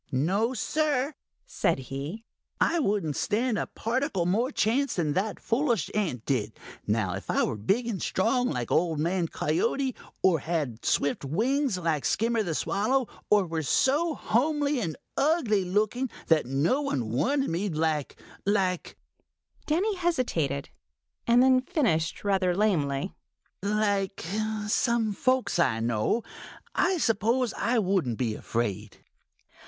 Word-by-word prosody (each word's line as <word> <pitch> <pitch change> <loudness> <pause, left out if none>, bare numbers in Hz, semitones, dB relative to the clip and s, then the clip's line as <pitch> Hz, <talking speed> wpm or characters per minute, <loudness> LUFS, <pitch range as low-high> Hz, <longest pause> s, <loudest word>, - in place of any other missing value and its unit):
"No, 195 - +1
Sir," 295 +3 0 0.3
said - - 0
he, 140 - -6 0.3
"I 340 - +2
wouldn't 195 - 0
stand 225 +1 0
a - - -2
particle 235 - -1
more 220 +8 +1
chance 270 +3 +1
than 155 -5 0
that 200 +4 -1
foolish 235 - 0
ant 165 - -1
did. 110 -6 -1 0.3
Now 105 -3 +1
if - - -7
I - - +2
were - - -1
big 195 - 0
and 220 -6 -3
strong, 245 +6 +1
like 120 -2 -3
Old 165 -2 +2
Man 170 +3 0
Coyote, 230 - 0 0.3
or 180 -4 +4
had 145 -7 -3
swift 140 - +1
wings, 235 - 0
like 165 -5 -1
Skimmer 230 +1 +1
the 170 -6 -2
Swallow, 230 - +1 0.2
or 205 -2 +4
were 165 -1 -2
so 290 - +2
homely 290 +3 +1
and 165 -9 -3 0.2
ugly 275 - +2
looking 215 +7 0 0.2
that 155 -6 +4
no 145 - +1
one 125 - -2
wanted 270 - +1
me, 185 +5 -1
like—like—" 165 +4 -2 0.7
Danny 385 +7 +1
hesitated 205 - -1 0.6
and 240 +1 +6
then 260 -1 +5
finished 240 - 0
rather 190 -3 +2
lamely, 175 -5 0 0.5
"like 200 -2 0 0.4
some 225 0 +1
folks 255 -3 +1
I 120 -9 +2
know, 115 - 0 0.5
I 370 0 +2
suppose 235 -1 +1
I 240 +1 0
wouldn't 185 - +1
be 120 -4 -1
afraid." 105 -2 -3
200 Hz, 135 wpm, -27 LUFS, 155-250 Hz, 0.7 s, and